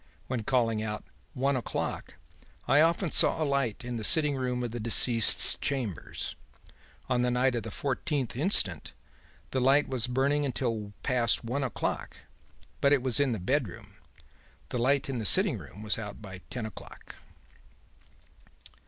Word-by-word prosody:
When 125 -3 -3
calling 115 -2 0
out 105 -1 -5 0.3
"one 135 +2 0
o'clock" 125 - -4 0.5
I 145 - +5
often 165 +1 +1
saw - - +4
a 155 - 0
light 135 -4 -2
in 125 -1 -4
the 110 - -6
sitting 150 +4 +4
room 125 -1 -2
of 120 - -4
the 120 - -5
deceased's 115 0 +5
chambers. 125 - -4 0.7
On 125 -1 0
the 125 - +1
night 125 +1 +1
of 120 - -2
the 110 - -7
fourteenth 135 +2 -3
instant, 125 - +1 0.6
the 130 - -1
light 135 +3 +3
was 125 -3 -1
burning 135 +4 0
until 115 -6 -3
past 120 -3 +1
one 125 +5 -3
o'clock, 125 - -4 0.6
but 140 - +3
it 140 -3 +3
was 130 -1 +1
in 140 -3 +2
the 110 - -3
bedroom. 125 +1 -3 0.8
The 125 - -3
light 135 +3 +1
in 130 -3 -3
the - - -4
sitting 105 - +4
room 105 - -12
was 110 +1 +1
out 105 -2 -8
by 95 -3 -10
ten 125 -3 -5
o'clock.' 110 - -11
125 Hz, 160 wpm, -28 LUFS, 115-140 Hz, 0.8 s, I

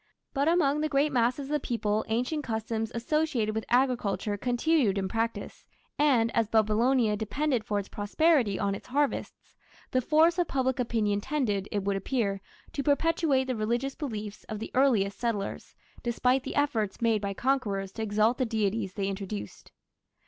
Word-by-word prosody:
But 280 0 +1
among 300 -4 +3
the 310 - 0
great 290 +1 +2
masses 250 +2 +1
of 275 - -8
the 300 - +2
people 220 -4 -1
ancient 250 +7 -1
customs 225 -1 -3
associated 245 -3 0
with 220 0 -3
agriculture 240 -5 +1
continued 245 0 +1
in 190 -1 -1
practice, 225 +3 -3 0.4
and, 250 -6 +3
as 230 -2 +2
Babylonia 220 +1 +3
depended 250 +3 -1
for 210 -1 -2
its 200 -1 -3
prosperity 225 - +2
on 200 -1 0
its 200 - -8
harvests, 285 +2 -2 0.4
the 255 - +2
force 320 +6 +3
of 350 - +2
public 260 -2 0
opinion 215 -4 0
tended, 210 -8 -1
it 205 -2 -1
would 200 0 0
appear, 200 -2 -1 0.3
to 280 - -2
perpetuate 290 -1 +2
the 255 -1 -2
religious 240 +5 -1
beliefs 215 -8 -6
of 215 - -5
the 220 - -6
earliest 220 -7 +2
settlers, 225 -5 -3 0.3
despite 250 +2 +1
the 270 - -6
efforts 230 -9 0
made 225 -3 +2
by 200 -1 -3
conquerors 210 -8 0
to 225 - -6
exalt 215 +3 +2
the - - +3
deities 215 -3 -1
they 200 -2 -2
introduced. 190 - -6
230 Hz, 165 wpm, -28 LUFS, 210-275 Hz, 0.4 s, among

